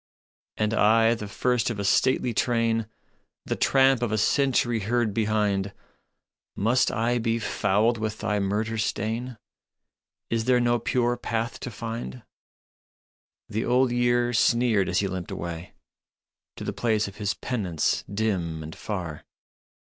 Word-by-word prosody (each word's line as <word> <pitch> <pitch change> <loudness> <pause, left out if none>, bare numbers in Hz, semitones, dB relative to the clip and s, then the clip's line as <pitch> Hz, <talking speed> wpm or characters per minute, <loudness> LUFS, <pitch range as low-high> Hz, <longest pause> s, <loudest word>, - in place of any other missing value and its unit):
" - - -72
And 105 0 0
I, 115 +1 +4
the 105 -3 -5
first 125 +4 0
of 115 - -3
a 100 - -3
stately 125 +3 +2
train, 115 -1 +1 0.6
The - - -1
tramp 135 -2 +3
of 120 -3 -1
a 110 - +1
century 120 0 +2
heard 110 +1 0
behind, 105 -2 0 0.8
Must 115 +6 +2
I 120 +2 0
be 115 0 0
fouled 110 +1 +1
with 110 0 -3
thy 105 0 -1
murder 105 +3 -1
stain? 115 +3 -2 0.9
Is 115 -1 0
there 125 -1 +4
no 120 0 +2
pure 120 +1 0
path 115 -1 -3
to - - -5
find? 115 - -6 0.7
" - - -75
The 110 +2 -2
Old 125 0 +2
Year 120 0 +2
sneered 115 -4 +3
as 90 +1 +1
he 100 - 0
limped 95 -2 -5
away 85 0 -6 0.8
To - - -7
the - - -3
place 110 -3 0
of 100 - -10
his 105 -1 -1
penance 95 -11 -1
dim 95 -7 -1
and 80 +1 -8
far. 90 -8 -5
110 Hz, 145 wpm, -26 LUFS, 100-120 Hz, 0.9 s, I